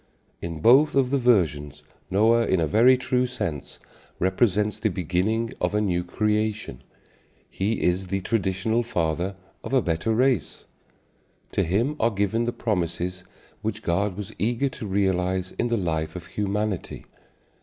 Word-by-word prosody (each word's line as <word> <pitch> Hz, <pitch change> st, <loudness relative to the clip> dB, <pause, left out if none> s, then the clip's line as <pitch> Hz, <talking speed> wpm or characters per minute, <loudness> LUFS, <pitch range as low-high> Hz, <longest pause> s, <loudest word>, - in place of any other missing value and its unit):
In 85 Hz, -2 st, -5 dB
both 135 Hz, +7 st, +5 dB
of 135 Hz, -2 st, +2 dB
the 140 Hz, -, +2 dB
versions 75 Hz, -, +1 dB, 0.3 s
Noah 115 Hz, +4 st, +3 dB
in 95 Hz, -, +2 dB
a 80 Hz, -, +2 dB
very 120 Hz, -, +5 dB
true 125 Hz, 0 st, 0 dB
sense 80 Hz, -, -5 dB, 0.4 s
represents 105 Hz, +2 st, +1 dB
the 110 Hz, -, +1 dB
beginning 100 Hz, +7 st, -1 dB
of -, -, 0 dB
a -, -, +3 dB
new 90 Hz, -4 st, 0 dB
creation: 105 Hz, -, -1 dB, 0.7 s
he 105 Hz, +4 st, -1 dB
is 90 Hz, +2 st, +1 dB
the 95 Hz, +1 st, -1 dB
traditional 105 Hz, +2 st, 0 dB
father 90 Hz, -4 st, -1 dB, 0.3 s
of -, -, -6 dB
a 130 Hz, -, +4 dB
better 85 Hz, +6 st, -1 dB
race. 125 Hz, -, 0 dB, 0.9 s
To -, -, +1 dB
him 110 Hz, -, 0 dB
are 115 Hz, -, +3 dB
given 105 Hz, +2 st, 0 dB
the 120 Hz, -, 0 dB
promises 90 Hz, -5 st, -2 dB, 0.4 s
which 110 Hz, 0 st, -4 dB
God 95 Hz, +2 st, 0 dB
was 105 Hz, +1 st, -6 dB
eager 120 Hz, +5 st, +1 dB
to 125 Hz, -4 st, -7 dB
realize 95 Hz, -1 st, 0 dB
in 120 Hz, -, +1 dB
the 120 Hz, -1 st, 0 dB
life 80 Hz, -4 st, -2 dB
of 90 Hz, -2 st, -7 dB
humanity. 105 Hz, +1 st, -3 dB
100 Hz, 150 wpm, -25 LUFS, 90-115 Hz, 0.9 s, both